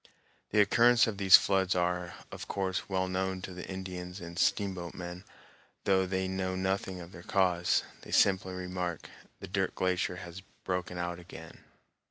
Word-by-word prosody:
The 105 Hz, -, +2 dB
occurrence 115 Hz, +4 st, +5 dB
of 105 Hz, -3 st, -4 dB
these 95 Hz, -1 st, +9 dB
floods 95 Hz, -2 st, +3 dB
are, 90 Hz, 0 st, -1 dB, 0.2 s
of -, -, -7 dB
course, 95 Hz, -1 st, -2 dB
well 95 Hz, -1 st, 0 dB
known 95 Hz, 0 st, -1 dB
to 95 Hz, -, -6 dB
the 90 Hz, 0 st, -7 dB
Indians 90 Hz, -1 st, -6 dB
and 85 Hz, 0 st, -7 dB
steamboat 95 Hz, -5 st, 0 dB
men, 90 Hz, 0 st, -7 dB, 0.6 s
though 95 Hz, -1 st, +3 dB
they 95 Hz, 0 st, -1 dB
know 95 Hz, 0 st, -2 dB
nothing 95 Hz, 0 st, -1 dB
of 85 Hz, 0 st, -10 dB
their 90 Hz, -, -10 dB
cause. 90 Hz, -2 st, +2 dB, 0.2 s
They -, -, -13 dB
simply 95 Hz, -1 st, +3 dB
remark, 90 Hz, -2 st, -4 dB, 0.3 s
"The -, -, -6 dB
Dirt 95 Hz, 0 st, -1 dB
Glacier 90 Hz, 0 st, 0 dB
has 90 Hz, 0 st, -8 dB, 0.2 s
broken 90 Hz, -1 st, -2 dB
out 85 Hz, 0 st, -3 dB
again." 80 Hz, -2 st, -12 dB
95 Hz, 165 wpm, -31 LUFS, 90-95 Hz, 0.6 s, these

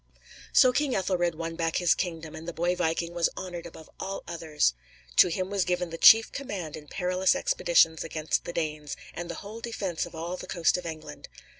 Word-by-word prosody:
So 255 Hz, -1 st, +6 dB
King 280 Hz, -1 st, +1 dB
Ethelred 175 Hz, -3 st, 0 dB
won 165 Hz, +1 st, -4 dB
back 165 Hz, -1 st, -1 dB
his 175 Hz, -2 st, +4 dB
kingdom, 165 Hz, -3 st, -4 dB
and 160 Hz, +1 st, -9 dB
the 170 Hz, -, -4 dB
boy 175 Hz, +2 st, 0 dB
viking 170 Hz, 0 st, -1 dB
was 170 Hz, -1 st, +2 dB
honored 175 Hz, -2 st, -6 dB
above 160 Hz, -1 st, -13 dB
all 195 Hz, 0 st, -4 dB
others. 160 Hz, -, 0 dB, 0.4 s
To -, -, +8 dB
him 185 Hz, +2 st, -2 dB
was 200 Hz, -2 st, +1 dB
given 180 Hz, -1 st, -1 dB
the 165 Hz, -, -5 dB
chief 225 Hz, 0 st, +8 dB
command 195 Hz, -, -5 dB
in 150 Hz, -1 st, -11 dB
perilous 185 Hz, +2 st, +1 dB
expeditions 165 Hz, -2 st, +3 dB
against 160 Hz, -1 st, -2 dB
the -, -, -4 dB
Danes, 155 Hz, -3 st, -3 dB, 0.2 s
and 175 Hz, 0 st, -6 dB
the -, -, -4 dB
whole 220 Hz, +3 st, -8 dB
defence 200 Hz, -8 st, -3 dB
of -, -, -12 dB
all 170 Hz, +3 st, -4 dB
the -, -, -8 dB
coast 170 Hz, -3 st, +2 dB
of 180 Hz, -1 st, -4 dB
England. 155 Hz, -, -8 dB
170 Hz, 200 wpm, -28 LUFS, 160-185 Hz, 0.4 s, To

